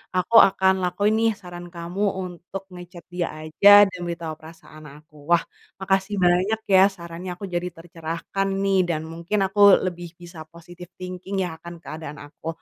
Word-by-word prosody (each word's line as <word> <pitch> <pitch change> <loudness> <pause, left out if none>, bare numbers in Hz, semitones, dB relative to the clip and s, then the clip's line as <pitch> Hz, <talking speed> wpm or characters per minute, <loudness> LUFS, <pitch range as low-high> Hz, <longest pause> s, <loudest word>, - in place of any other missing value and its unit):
aku 185 +5 0
akan 190 0 +2
lakuin 200 +4 +1
nih, 225 0 +3
saran 175 -1 -9
kamu 170 +4 -4 0.2
untuk 180 +2 -8
nge-chat 180 -1 -11
dia 175 -1 -2 0.2
aja, 155 +6 +1 0.2
dan 185 - -10
beritahu 170 -2 -5
perasaan 155 -1 -14
aku. 150 +1 -20 0.2
Wah, 170 - -1 0.4
makasih 195 +1 0
banyak 185 +5 +2
ya 190 - +8
sarannya, 170 +1 -8
aku 200 - -13
jadi 175 +1 -1
tercerahkan 165 +3 -4 0.2
nih, 195 -1 +2
dan 155 -2 -1
mungkin 170 +5 -2
aku 200 +2 -4 0.3
lebih 175 -1 -4
bisa 175 -1 -11
positive 175 +2 -13
thinking 185 +2 -7
ya 180 - -3
akan 170 +1 -9
keadaan 155 -2 -8
aku. 145 +2 -13
175 Hz, 160 wpm, -23 LUFS, 170-190 Hz, 0.4 s, ya